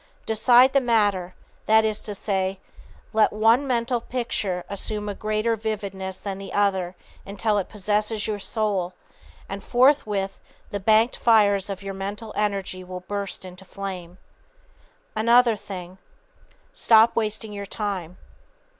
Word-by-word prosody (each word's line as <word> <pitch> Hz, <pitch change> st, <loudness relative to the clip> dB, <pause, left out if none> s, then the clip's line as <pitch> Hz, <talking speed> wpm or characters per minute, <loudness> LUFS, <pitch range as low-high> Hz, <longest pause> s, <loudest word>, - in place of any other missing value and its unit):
Decide 245 Hz, +4 st, +5 dB
the 275 Hz, -, +4 dB
matter 205 Hz, -7 st, +1 dB, 0.3 s
that 220 Hz, 0 st, +5 dB
is 215 Hz, -1 st, 0 dB
to 210 Hz, -, -5 dB
say, 190 Hz, -1 st, -1 dB, 0.5 s
_let 220 Hz, 0 st, +4 dB
one 225 Hz, +6 st, +3 dB
mental 240 Hz, -1 st, 0 dB
picture 210 Hz, -7 st, -2 dB
assume 210 Hz, +1 st, -2 dB
a 205 Hz, -, -2 dB
greater 215 Hz, +2 st, 0 dB
vividness 200 Hz, -3 st, -4 dB
than 195 Hz, -1 st, -5 dB
the 195 Hz, -, -8 dB
other 190 Hz, -3 st, +1 dB, 0.3 s
until 205 Hz, +1 st, 0 dB
it 190 Hz, -, -4 dB
possesses 210 Hz, +1 st, -1 dB
your 210 Hz, -1 st, -2 dB
soul 200 Hz, -4 st, -1 dB, 0.5 s
and 195 Hz, 0 st, -6 dB
forthwith 220 Hz, -7 st, +2 dB, 0.3 s
the 205 Hz, -, -2 dB
banked 220 Hz, +4 st, +3 dB
fires 205 Hz, -4 st, +4 dB
of 195 Hz, 0 st, -5 dB
your 195 Hz, 0 st, -5 dB
mental 200 Hz, +3 st, -6 dB
energy 195 Hz, -3 st, -2 dB
will 180 Hz, 0 st, -7 dB
burst 200 Hz, 0 st, -4 dB
into 180 Hz, +1 st, -10 dB
flame_. 185 Hz, -2 st, -7 dB, 1.0 s
Another 235 Hz, +1 st, +5 dB
thing: 185 Hz, -2 st, -9 dB, 0.7 s
Stop 225 Hz, 0 st, +5 dB
wasting 215 Hz, -1 st, -2 dB
your 200 Hz, -1 st, -6 dB
time. 190 Hz, -5 st, -4 dB
205 Hz, 135 wpm, -24 LUFS, 195-220 Hz, 1.0 s, Decide